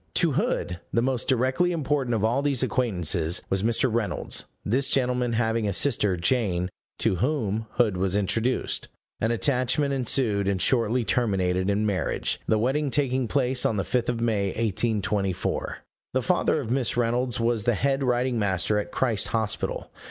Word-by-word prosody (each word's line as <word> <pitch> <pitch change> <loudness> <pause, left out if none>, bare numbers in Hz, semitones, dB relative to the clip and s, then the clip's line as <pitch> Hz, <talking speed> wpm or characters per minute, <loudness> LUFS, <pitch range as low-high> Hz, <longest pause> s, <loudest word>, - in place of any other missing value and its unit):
To - - +3
Hood 90 -1 -1
the 115 - +1
most 130 -2 -1
directly 130 +8 +2
important 145 -6 0
of 105 - -1
all 120 +5 +2
these 140 -3 +1
acquaintances 90 - 0
was 95 0 +1
Mr. 115 +4 +1
Reynolds; 110 -6 -1 0.2
this 130 +6 +1
gentleman 125 -3 +1
having 115 -1 0
a 100 - -1
sister, 105 -5 +2
Jane, 90 -2 0 0.3
to 95 - 0
whom 110 - -1
Hood 105 -6 +2
was 95 +1 0
introduced. 110 +5 0 0.3
An 115 - 0
attachment 130 +3 +1
ensued, 115 -6 +2
and 100 -2 0
shortly 120 +1 +2
terminated 95 -6 0
in 105 +2 +1
marriage, 95 -5 -1
the 110 - +3
wedding 135 +6 0
taking 130 -3 +1
place 130 -1 +1
on 110 - +1
the 100 - 0
5th 125 +2 -1
of 120 -1 -2
May, 110 -4 +1
1824. 105 -2 -1 0.4
The 130 - +1
father 180 -3 +1
of 120 -5 -4
Miss 125 -2 0
Reynolds 120 +1 0
was 115 -3 0
the 120 - +2
head 135 +5 0
writing 125 -1 +1
master 100 +1 +1
at 105 - -5
Christ 115 -6 0
Hospital. 110 -3 -2
115 Hz, 165 wpm, -25 LUFS, 100-130 Hz, 0.4 s, To